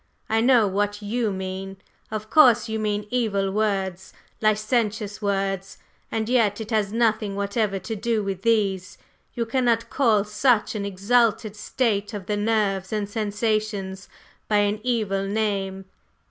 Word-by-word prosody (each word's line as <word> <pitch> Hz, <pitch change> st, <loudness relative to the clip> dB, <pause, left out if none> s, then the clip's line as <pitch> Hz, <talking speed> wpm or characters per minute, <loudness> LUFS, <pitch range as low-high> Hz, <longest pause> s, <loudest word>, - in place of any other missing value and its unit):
I 225 Hz, 0 st, +3 dB
know 240 Hz, -2 st, +5 dB
what 205 Hz, +2 st, -1 dB
you 225 Hz, +2 st, 0 dB
mean, 190 Hz, 0 st, -5 dB, 0.3 s
of 215 Hz, 0 st, -5 dB
course; 245 Hz, -7 st, +6 dB
you 220 Hz, 0 st, -2 dB
mean 210 Hz, -1 st, -1 dB
evil 200 Hz, -6 st, 0 dB
words, 190 Hz, -3 st, -1 dB, 0.3 s
licentious 215 Hz, -1 st, 0 dB
words, 195 Hz, -1 st, -2 dB, 0.3 s
and 220 Hz, -1 st, -1 dB
yet 225 Hz, -4 st, +2 dB
it 220 Hz, +1 st, -6 dB
has 210 Hz, -3 st, +1 dB
nothing 220 Hz, -3 st, +1 dB
whatever 200 Hz, 0 st, -1 dB
to 195 Hz, +4 st, -5 dB
do 220 Hz, 0 st, 0 dB
with 195 Hz, -2 st, -3 dB
these. 200 Hz, -5 st, 0 dB, 0.4 s
You 235 Hz, -, -1 dB
cannot 235 Hz, -1 st, +1 dB
call 225 Hz, -7 st, +3 dB
such 210 Hz, +2 st, +2 dB
an 205 Hz, -2 st, -3 dB
exalted 215 Hz, +2 st, +1 dB
state 210 Hz, -1 st, -1 dB
of 195 Hz, -3 st, -6 dB
the 210 Hz, -, -1 dB
nerves 205 Hz, -3 st, 0 dB
and 210 Hz, -2 st, -1 dB
sensations 210 Hz, -2 st, -2 dB, 0.4 s
by 210 Hz, -, +2 dB
an 205 Hz, +1 st, -1 dB
evil 210 Hz, -5 st, -1 dB
name." 195 Hz, -2 st, -2 dB
210 Hz, 145 wpm, -24 LUFS, 195-225 Hz, 0.4 s, course